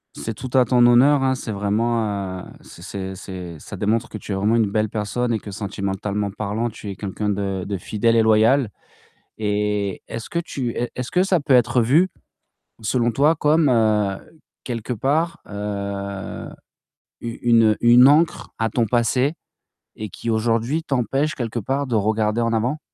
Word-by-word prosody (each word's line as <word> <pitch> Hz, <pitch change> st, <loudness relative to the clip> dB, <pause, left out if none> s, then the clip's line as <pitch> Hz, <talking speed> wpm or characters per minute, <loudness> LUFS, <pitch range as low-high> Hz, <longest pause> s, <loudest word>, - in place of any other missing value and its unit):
C'est 115 Hz, -, -4 dB
tout 130 Hz, +4 st, -7 dB
à 130 Hz, -, +6 dB
ton 125 Hz, +1 st, +3 dB
honneur, 135 Hz, +4 st, +5 dB
hein, 130 Hz, 0 st, +2 dB
c'est 125 Hz, -, -6 dB
vraiment, 105 Hz, -2 st, -1 dB
heu, -, -, -10 dB, 0.2 s
c'est -, -, -14 dB
c'est 95 Hz, +1 st, -6 dB
c'est 90 Hz, -3 st, -8 dB
ça -, -, -9 dB
démontre 110 Hz, +2 st, 0 dB
que -, -, -6 dB
tu 105 Hz, -, -8 dB
es -, -, 0 dB
vraiment 105 Hz, +4 st, +2 dB
une 110 Hz, -3 st, +2 dB
belle 110 Hz, 0 st, 0 dB
personne 110 Hz, +4 st, -2 dB
et 110 Hz, -, 0 dB
que 105 Hz, -, -9 dB
sentimentalement 100 Hz, 0 st, -3 dB
parlant, 110 Hz, +3 st, -3 dB
tu 105 Hz, -1 st, -9 dB
es 100 Hz, -, -5 dB
quelqu'un 105 Hz, +2 st, -3 dB
de 100 Hz, -2 st, -2 dB
de 100 Hz, +1 st, -3 dB
fidèle 110 Hz, +5 st, 0 dB
et 115 Hz, -, +4 dB
loyal. 110 Hz, +3 st, +4 dB, 0.7 s
Et 105 Hz, -2 st, -1 dB
est-ce 115 Hz, -, -6 dB
que -, -, -3 dB
tu 140 Hz, -7 st, -3 dB
est 120 Hz, -, -2 dB
est-ce 125 Hz, -1 st, -4 dB
que 180 Hz, -, +2 dB
ça 190 Hz, -2 st, +2 dB
peut 145 Hz, -3 st, +3 dB
être 125 Hz, 0 st, +3 dB
vu, 150 Hz, +11 st, +3 dB, 0.7 s
selon 120 Hz, +2 st, +1 dB
toi, 145 Hz, +7 st, +3 dB
comme, 150 Hz, +1 st, +3 dB
heu, 105 Hz, -4 st, +2 dB, 0.5 s
quelque 120 Hz, 0 st, -4 dB
part, 160 Hz, +9 st, 0 dB
heu, 100 Hz, -1 st, -5 dB, 0.7 s
u 115 Hz, 0 st, -6 dB
une, 115 Hz, -1 st, +4 dB
heu, 105 Hz, -, -1 dB
une 120 Hz, +3 st, +7 dB
ancre 160 Hz, +3 st, +2 dB
à 115 Hz, 0 st, +1 dB
ton 115 Hz, +2 st, +1 dB
passé 125 Hz, +6 st, +1 dB, 0.6 s
et 110 Hz, -1 st, -6 dB
qui 115 Hz, -, -7 dB
aujourd'hui 115 Hz, +6 st, 0 dB
t'empêche 135 Hz, +1 st, 0 dB
quelque 120 Hz, -2 st, -3 dB
part 135 Hz, +6 st, -1 dB
de 125 Hz, -, -3 dB
regarder 110 Hz, +1 st, +1 dB
en 115 Hz, 0 st, 0 dB
avant? 120 Hz, +7 st, 0 dB
115 Hz, 180 wpm, -22 LUFS, 105-125 Hz, 0.7 s, une